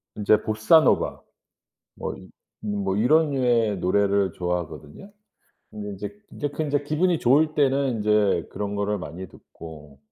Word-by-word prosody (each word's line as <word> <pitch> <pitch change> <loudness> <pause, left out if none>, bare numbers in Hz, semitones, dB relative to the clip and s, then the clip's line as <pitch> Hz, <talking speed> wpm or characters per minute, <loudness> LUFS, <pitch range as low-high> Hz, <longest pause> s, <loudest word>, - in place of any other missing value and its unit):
인제 105 0 +3
보사노바 110 +10 +3 0.7
뭐 - - -5
이 - - -13 0.4
음 105 -1 -2
뭐 95 0 -1
이런 150 +7 +3
류의 120 -6 +1
노래를 100 0 +1
좋아하거든요. 90 - -5 0.6
근데 105 -1 -7
인제, 105 - -7
인제 145 - -3
그건 155 +2 -3
인제 145 0 0
기분이 165 +4 +1
좋을 150 +5 +3
때는 140 -1 +2
인제 105 -1 +1
그런 105 0 -4
거를 100 0 -1
많이 95 +2 -8
듣고 75 -5 -13
105 Hz, 295 characters per minute, -24 LUFS, 100-140 Hz, 0.7 s, 인제